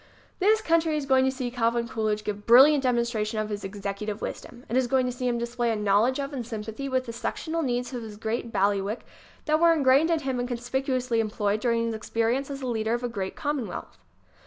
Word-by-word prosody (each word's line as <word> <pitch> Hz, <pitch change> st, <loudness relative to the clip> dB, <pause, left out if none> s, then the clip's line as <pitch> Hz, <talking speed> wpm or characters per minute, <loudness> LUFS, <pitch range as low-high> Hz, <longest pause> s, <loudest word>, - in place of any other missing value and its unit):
This 430 Hz, +3 st, +4 dB
country 325 Hz, -4 st, +2 dB
is 290 Hz, -, -3 dB
going 265 Hz, -1 st, +4 dB
to 265 Hz, -, +2 dB
see 255 Hz, -2 st, -4 dB
Calvin 235 Hz, -1 st, 0 dB
Coolidge 215 Hz, -2 st, -1 dB
give 205 Hz, 0 st, -5 dB
brilliant 270 Hz, +5 st, +8 dB
demonstration 235 Hz, -4 st, 0 dB
of 215 Hz, 0 st, -1 dB
his 205 Hz, -1 st, -4 dB
executive 200 Hz, +1 st, -4 dB
wisdom. 245 Hz, +2 st, -7 dB
It 235 Hz, -, -3 dB
is 260 Hz, -1 st, +3 dB
going 260 Hz, +1 st, +2 dB
to 250 Hz, -, -1 dB
see 250 Hz, +1 st, -3 dB
him 240 Hz, -1 st, +1 dB
display 240 Hz, 0 st, -1 dB
a 225 Hz, -, +1 dB
knowledge 210 Hz, +5 st, +2 dB
of 280 Hz, +1 st, -4 dB
and 255 Hz, -3 st, -3 dB
sympathy 225 Hz, +3 st, -5 dB
with 260 Hz, -1 st, 0 dB
the 230 Hz, -, -6 dB
sectional 320 Hz, +7 st, -3 dB
needs 245 Hz, -2 st, -2 dB
of 245 Hz, -, -4 dB
his 215 Hz, -2 st, -9 dB
great 225 Hz, +2 st, -3 dB
bail 200 Hz, -1 st, +3 dB
iwick 200 Hz, +3 st, -3 dB, 0.4 s
that 310 Hz, 0 st, +2 dB
were 335 Hz, 0 st, +6 dB
ingrained 280 Hz, +1 st, +4 dB
in 330 Hz, -2 st, +1 dB
him 265 Hz, -3 st, -2 dB
and 245 Hz, -, -1 dB
conspicuously 250 Hz, 0 st, -1 dB
employed 210 Hz, -1 st, 0 dB
during 230 Hz, 0 st, +1 dB
his 230 Hz, -, -2 dB
experience 230 Hz, +5 st, -1 dB
as 275 Hz, -1 st, -6 dB
leader 225 Hz, -2 st, 0 dB
of 240 Hz, -, -5 dB
a 245 Hz, -, -1 dB
great 195 Hz, -5 st, -4 dB
commonwealth. 290 Hz, -6 st, -4 dB
240 Hz, 220 wpm, -26 LUFS, 220-265 Hz, 0.4 s, brilliant